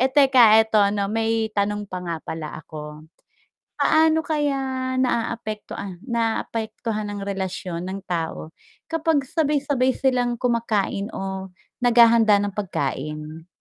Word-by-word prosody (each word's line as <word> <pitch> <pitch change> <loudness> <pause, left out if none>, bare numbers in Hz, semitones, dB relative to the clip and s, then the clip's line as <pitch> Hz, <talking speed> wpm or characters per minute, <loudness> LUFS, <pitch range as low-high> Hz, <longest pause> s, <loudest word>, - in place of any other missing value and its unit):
teka 260 -6 +7
eto 220 0 0
ano 200 0 +2
may 225 0 0
tanong 205 0 -1
pa 185 - -4
nga 170 -1 -2
pala 155 -1 -6
ako 150 0 -10 0.7
paano 320 0 +4
kaya 290 -2 0 0.4
naaapektuha 215 -6 -3
naapektuhan 225 -2 -2
ang 205 - -5
relasyon 190 -3 -4
ng 190 +1 -5
tao 165 -2 -3 0.4
kapag 325 -2 +1
sabay 300 -2 +1
sabay 260 -3 +1
silang 250 -2 +1
kumakain 230 -5 0
o 190 -1 -5 0.3
naghahanda 230 -3 +5
ng 205 - -1
pagkain? 155 -3 -4
215 Hz, 115 wpm, -23 LUFS, 190-245 Hz, 0.7 s, teka